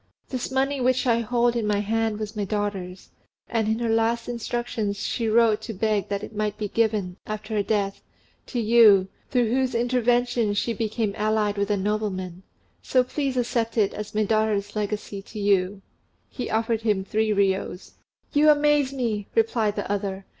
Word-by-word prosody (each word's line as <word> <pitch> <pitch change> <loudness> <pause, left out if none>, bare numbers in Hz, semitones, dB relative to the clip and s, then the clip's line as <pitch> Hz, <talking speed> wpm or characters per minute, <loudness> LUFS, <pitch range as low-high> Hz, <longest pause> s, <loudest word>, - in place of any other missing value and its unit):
This 255 -2 -3
money 265 +1 0
which 255 +1 +2
I 235 -2 +3
hold 240 +1 +1
in 230 -3 -1
my 210 -1 +2
hand 220 +1 0
was 215 0 -5
my 210 - -1
daughter's; 195 -3 -4 0.4
and 225 -2 0
in 220 0 +1
her 235 0 -1
last 230 +1 +1
instructions 235 -3 -3
she 230 -2 -1
wrote 220 -1 +4
to 225 +1 -6
beg 210 -1 0
that 200 0 -2
it - - -8
might 210 0 -1
be 210 -1 -2
given, 210 -5 0
after 215 +1 -5
her 210 - +2
death, 200 -1 -1 0.5
to 245 - -3
you, 215 -4 +6 0.2
through 245 -4 +1
whose 260 0 +1
intervention 240 -2 +1
she 230 +3 0
became 220 -2 -2
allied 215 -1 +1
with 200 0 -1
a 205 - +2
nobleman: 190 -3 -2 0.4
so 255 -1 +2
please 270 0 -2
accept 235 -1 -1
it 205 -3 +2
as 210 0 -7
my 215 - +3
daughter's 210 -1 0
legacy 210 -1 -3
to 210 +2 -9
you;" 205 0 +4
and 185 +1 -4
as 205 - -13 0.6
he 250 - -2
spoke, - - -5
he - - -7
offered 225 0 0
him 210 -4 +1
three 220 +2 0
riyos. 195 -2 0 0.4
"You 300 +1 +5
amaze 295 -2 +4
me!" 230 -7 -2
replied 235 - +2
the 205 - -3
other. 195 -1 -3
220 Hz, 190 wpm, -25 LUFS, 205-235 Hz, 0.6 s, you